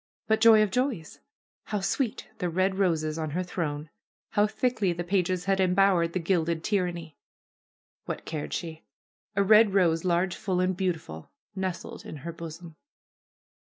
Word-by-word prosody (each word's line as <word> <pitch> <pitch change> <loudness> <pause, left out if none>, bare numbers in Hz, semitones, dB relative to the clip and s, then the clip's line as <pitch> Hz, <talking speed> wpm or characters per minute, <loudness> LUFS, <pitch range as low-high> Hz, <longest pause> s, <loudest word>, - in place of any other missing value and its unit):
But, 220 0 +1
joy 220 -2 +7
of 205 - -1
joys! 250 - -2 0.5
How 210 - -2
sweet 220 +4 -2
the 180 -3 -1
red 190 +3 0
roses 160 -4 +1
on 155 -1 -2
her 185 - 0
throne! 155 -4 -4 0.4
How 210 0 +3
thickly 215 -3 0
the 175 +1 -4
pages 180 0 0
had 195 0 +1
embowered 185 -2 +3
the 185 - 0
gilded 170 -2 0
tyranny! 175 -6 -2 0.9
What - - -5
cared 155 -2 -5
she! 160 -2 -5 0.5
A 200 - +3
red 210 0 +6
rose, 165 -4 +3
large, 180 0 +1
full 185 -2 -2
and 185 0 +1
beautiful, 165 - -3 0.3
nestled 190 -2 -4
in - - -8
her 170 - -3
bosom. 165 0 -9
180 Hz, 155 wpm, -27 LUFS, 165-195 Hz, 0.9 s, joy